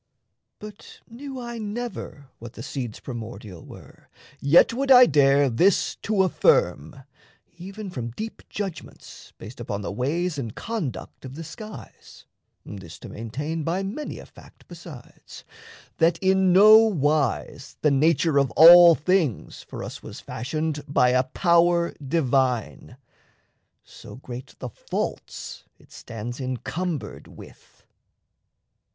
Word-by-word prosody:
But 210 -1 -12
knew 265 +3 -9
I 240 -1 -7
never 210 - -6
what 115 0 -10
The 115 - -9
seeds 125 -5 -6
primordial 110 -7 -9
were, - - -15 0.3
yet 150 +10 +4
would 270 +3 -2
I 250 -1 +9
dare 140 - +3
This 170 - +2
to 205 -3 0
affirm, 135 - +1 0.6
even 195 +2 -8
from 120 -7 -5
deep 220 - -8
judgments 195 -5 -8
based 115 +4 -11
Upon 105 -4 -5
the - - -4
ways 150 - -2
and 115 -5 -6
conduct 165 - -6
of 130 0 -9
the 165 - -7
skies 215 +7 -12 0.4
This 90 -5 -10
to - - -11
maintain 145 +9 -5
by 175 +5 -2
many 230 +11 -6
a - - -11
fact - - -19
besides 165 -7 -13 0.5
That 165 +1 +3
in 190 0 +2
no 210 +4 +8
wise 150 -8 -1
the 150 - +4
nature 155 +1 +2
of 140 -2 +1
all 170 +1 +9
things 160 - -1
For - - -9
us - - -8
was - - -10
fashioned 155 +2 -4
by 130 -3 +3
a 130 +1 +2
power 170 +3 +2
divine 130 -4 -1 0.9
So - - -13
great 125 -1 -10
the 125 - -7
faults - - -6
it - - -24
stands 115 +3 -8
encumbered 130 - -5
with. - - -16
155 Hz, 130 wpm, -24 LUFS, 125-190 Hz, 0.9 s, I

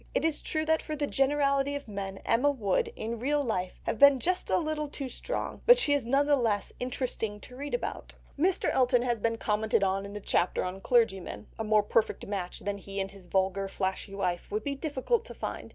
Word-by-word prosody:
It - - +2
is 320 -2 +1
true 310 -1 -1
that 320 0 +2
for 310 - -4
the 290 -1 0
generality 280 0 +2
of 285 -2 -6
men 195 -2 -5
Emma 250 +5 +3
would, 270 - +1
in 230 +1 -4
real 290 +4 +1
life, 185 -7 -2
have 220 - -2
been 280 -2 +8
just 365 +6 -1
a - - +3
little 310 -2 -1
too 280 -1 -5
strong, - - -4
but 485 +1 +9
she 310 -12 +2
is 285 -5 +1
none 275 +4 +3
the 290 0 +4
less 225 -6 0
interesting 245 -4 -3
to 250 - -11
read 285 - -3
about. 485 - -5 0.2
Mr. 355 +6 +2
Elton 250 -1 +3
has 240 -2 0
already 230 +2 +1
been - - -10
commented 215 -1 +1
on 195 +1 0
in 200 - -9
the 210 - -5
chapter 185 -2 +1
on 185 +1 -5
clergymen; 215 -5 +1
a - - 0
more 215 -1 +3
perfect 215 +1 0
match 195 -3 -4
than 200 0 -3
he 195 +1 -6
and 195 0 -2
his 195 -3 -13
vulgar 195 +1 +1
flashy 190 +1 -3
wife 180 -3 -2
would 210 +1 -2
be 280 - -1
difficult 300 - -1
to - - -9
find. - - -5
240 Hz, 225 wpm, -29 LUFS, 200-285 Hz, 0.2 s, but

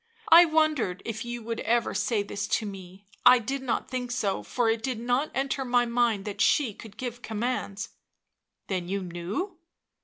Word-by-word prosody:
" 455 -1 -30
I 340 +2 +10
wondered 310 - +1
if 225 0 -4
you 240 -1 -5
would 230 +1 -4
ever 235 +2 +1
say 220 -4 0
this 200 +1 -4
to 220 - -5
me 195 -1 -9
— - - -38
I 255 - +9
did 265 +4 -3
not 255 -3 -1
think 250 -1 -4
so, 210 -6 -1
for 245 -2 -1
it 225 0 +1
did 250 -1 -2
not 245 +5 0
enter 270 0 -1
my 245 -1 +2
mind 235 -4 +1
that 205 -2 -4
she 255 -8 +3
could 215 0 -13
give 245 -2 -5
commands." 220 -3 -3 0.8
"Then 185 -3 -3
you 195 0 -2
knew?" 185 - -4
235 Hz, 190 wpm, -27 LUFS, 205-255 Hz, 0.8 s, I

